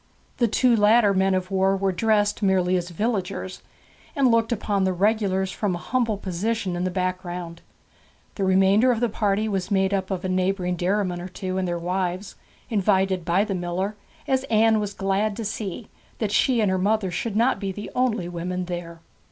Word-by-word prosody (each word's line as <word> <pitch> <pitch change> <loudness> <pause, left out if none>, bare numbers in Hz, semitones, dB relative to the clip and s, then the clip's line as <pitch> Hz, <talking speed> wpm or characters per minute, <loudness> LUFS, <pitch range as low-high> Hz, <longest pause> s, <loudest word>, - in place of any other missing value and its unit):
The 240 - +3
two 240 +2 +3
latter 210 0 +4
men 190 0 +2
of 185 +1 -3
war 195 0 +2
were 195 0 0
dressed 210 +2 +1
merely 185 -2 +2
as 175 -1 -2
villagers, 185 -1 -3 0.5
and 270 -4 +3
looked 230 0 +2
upon 205 -3 0
the 190 0 +1
regulars 190 -1 +1
from 195 -2 -1
a - - -4
humble 230 +2 -1
position 195 +1 -2
in 175 +1 -2
the - - 0
background. 180 -2 -4 0.7
The 200 - -3
remainder 195 +6 +4
of 235 - 0
the 240 0 +1
party 210 0 0
was 195 -3 -2
made 195 -1 +1
up 190 -1 -1
of 190 -2 -3
a - - 0
neighbouring 185 0 0
dairyman 180 0 -1
or 180 - -6
two, 185 0 -4
and 185 - -1
their 175 0 -1
wives, 180 +2 -2 0.3
invited 190 -4 +1
by 180 +4 +2
the 205 - -3
miller, 185 +3 -2 0.3
as 265 -1 +1
Anne 220 -2 +3
was 205 -1 -4
glad 195 +2 0
to 225 - -4
see, 210 0 -5 0.3
that 215 -3 -2
she 245 +1 +3
and 205 -3 +2
her 190 - 0
mother 200 -1 +1
should 205 +4 -3
not 235 +4 +2
be 195 -2 -3
the 205 +2 -7
only 235 -8 0
women 180 +1 -4
there. 170 -1 -6
195 Hz, 195 wpm, -24 LUFS, 185-215 Hz, 0.7 s, latter